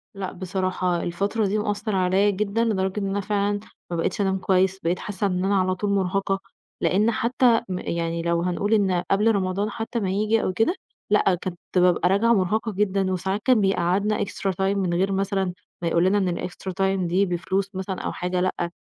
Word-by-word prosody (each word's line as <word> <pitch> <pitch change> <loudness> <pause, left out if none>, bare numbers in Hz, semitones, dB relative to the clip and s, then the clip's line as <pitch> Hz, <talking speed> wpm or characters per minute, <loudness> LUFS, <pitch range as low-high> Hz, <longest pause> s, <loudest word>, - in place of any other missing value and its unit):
لأ 195 -2 -4
بصراحة 185 -1 -1
الفترة 200 +5 -1
دي 200 +2 0
مأثّر 210 0 -2
عليّا 190 +2 +3
جدًا 205 +3 0
لدرجة 190 -2 0
إن 200 - -2
أنا 200 +1 -1
فعلًا 205 0 0 0.3
ما - - -1
بقيتش 165 +6 -1
أنام 190 -1 +1
كويس، 190 0 +1
بقيت 175 0 -1
حاسة 205 0 -2
إن 180 -1 -1
أنا 200 +1 +2
على 185 0 +1
طول 205 +2 -2
مُرهقة 195 0 0 0.4
لإن 210 +5 +3
حتى 235 +1 +2
م 180 -1 -2
يعني 170 0 -2
لو 170 0 0
هنقول 180 +4 0
إن 190 -5 +2
قبل 210 +3 +4
رمضان 195 +2 -1
حتى 225 +2 -3
ما 195 -4 -1
ييجي 215 +3 +1
أو 185 - -1
كده 225 - +1 0.3
لأ 205 -3 +3
كنت 175 -2 -5 0.2
بابقى 180 -1 +4
راجعة 220 +5 +4
مُرهقة 215 +3 +1
جدًا، 195 -1 0
وساعات 190 +3 -2
كان 255 -4 +4
بيقعّدنا 195 +2 +1
إكسترا 195 0 -2
تايم 195 +2 0
من 180 -3 0
غير 190 +3 +1
مثلًا 195 -1 0 0.3
ما 170 - -1
يقول 170 +1 +2
لنا 195 +2 +3
إن 195 -2 +1
الإكسترا 180 +2 -5
تايم 190 -1 0
دي 185 +4 +2
بفلوس 190 +2 -1
مثلًا 190 0 -4
أو - - -3
حاجة، 180 0 -2
لأ 180 -2 -1
195 Hz, 200 wpm, -24 LUFS, 185-205 Hz, 0.4 s, قبل